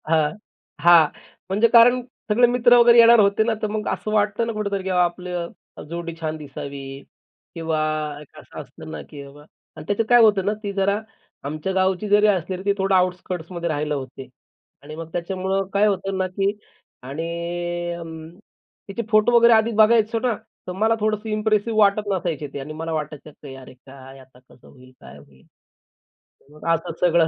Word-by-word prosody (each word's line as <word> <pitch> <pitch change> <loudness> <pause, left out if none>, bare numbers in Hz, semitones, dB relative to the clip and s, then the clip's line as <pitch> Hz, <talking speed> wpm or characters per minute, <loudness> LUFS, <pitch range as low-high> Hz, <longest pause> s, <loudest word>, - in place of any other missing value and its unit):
हां, 155 -2 +2 0.5
हां. 170 -1 +7 0.4
म्हणजे 210 +5 +3
कारण 245 +2 +6 0.3
सगळे 240 +3 +4
मित्र 245 0 +4
वगैरे 235 0 +6
येणार 230 0 +7
होते 200 +1 +3
ना, 230 +1 0
तर 215 - 0
मग 210 0 -4
असं 215 - -3
वाटतं 210 +2 +1
ना 230 - -3
कुठेतरी, 200 -2 -3
की 190 - -4
बाबा 180 -1 +3
आपलं 175 0 -4 0.4
जोडी 170 0 -5
छान 155 -1 -3
दिसावी 140 -1 -8 0.5
किंवा 160 -2 -2 0.4
एक 150 - -17
असं - - -12
असतं - - -12
ना, - - -6
की 145 -2 -11
बाबा 140 +1 -14 0.3
आणि - - -10
त्याचं 205 +2 0
काय 240 -1 +7
होतं 205 -4 +4
ना, 205 - +1
ती 200 - -3
जरा 200 +1 0 0.4
आमच्या 155 +6 -4
गावची 190 +2 0
जरी 210 +1 +5
असली 185 -2 0
तरी 185 - -8
ती 200 - +3
थोडं 195 0 +1
आउटस्कर्ट्समध्ये 180 -1 -2
राहिला 150 -1 -2
होते 135 -1 -8 0.6
आणि 150 +2 -9
मग 165 0 -8
त्याच्यामुळं 190 +3 -2
काय 200 +1 +3
होतं 195 -1 -2
ना, 185 0 0
की 195 +2 -1 0.5
आणि 150 +6 -5 0.6
अं, 160 -2 -9 0.6
तिचे 200 +3 -4
फोटो 215 +2 +4
वगैरे 235 0 +6
आधीच 220 0 +2
बघायचो 220 +1 +4
ना, 245 0 0 0.3
तर - - -4
मला 220 +5 +1
थोडंसं 215 +1 -2
इप्रेसिव्ह 215 +1 0
वाटत 205 0 +3
नसायचे 170 -6 -2
ते 140 - -5
आणि 145 +3 -7
मला 165 +1 -5
वाटायचं, 155 -1 -5
की 140 -2 -12
"अरे 130 -1 -13
काय 135 +1 -14
आता 130 -1 -19
कसं 125 -1 -22
होईल, 130 0 -18
काय 65 +3 -13
होईल?" 70 -2 -20 1.1
मग 150 - -14
असं 165 0 -3
सगळं 170 -2 +3
185 Hz, 180 wpm, -22 LUFS, 155-210 Hz, 1.1 s, हां